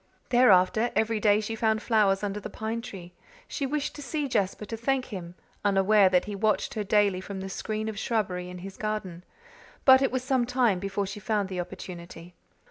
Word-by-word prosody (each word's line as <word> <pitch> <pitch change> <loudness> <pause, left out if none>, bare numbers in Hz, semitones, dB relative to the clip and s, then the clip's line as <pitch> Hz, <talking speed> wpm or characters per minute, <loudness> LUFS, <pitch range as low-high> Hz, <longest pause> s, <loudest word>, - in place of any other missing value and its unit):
Thereafter, 220 -2 +4
every 220 0 +1
day 210 0 +4
she 220 +1 -4
found 220 -1 +1
flowers 210 -4 +2
under 205 0 -2
the - - -7
pine 225 +1 -4
tree; 180 -7 -10 0.3
she 275 - -3
wished 295 +1 -2
to 290 - -9
see 295 0 -2
Jasper 210 -4 -1
to 225 - -5
thank 255 +3 0
him, 175 -2 -7 0.3
unaware 200 0 +4
that 180 -1 +2
he 210 - -5
watched 205 -1 0
her 215 - -2
daily 205 -2 +2
from 195 0 -7
the 190 0 -5
screen 215 +2 -3
of 215 -2 -4
shrubbery 185 -7 -2
in 180 - -8
his 195 - -9
garden; 210 -5 -4 0.6
but 260 0 +8
it 270 - +2
was 255 0 -2
some 260 -3 +1
time 245 -7 +2
before 195 +1 -2
she 195 +2 -6
found 210 -2 -1
the 185 -2 -4
opportunity. 175 -1 -8
210 Hz, 200 wpm, -27 LUFS, 190-230 Hz, 0.6 s, but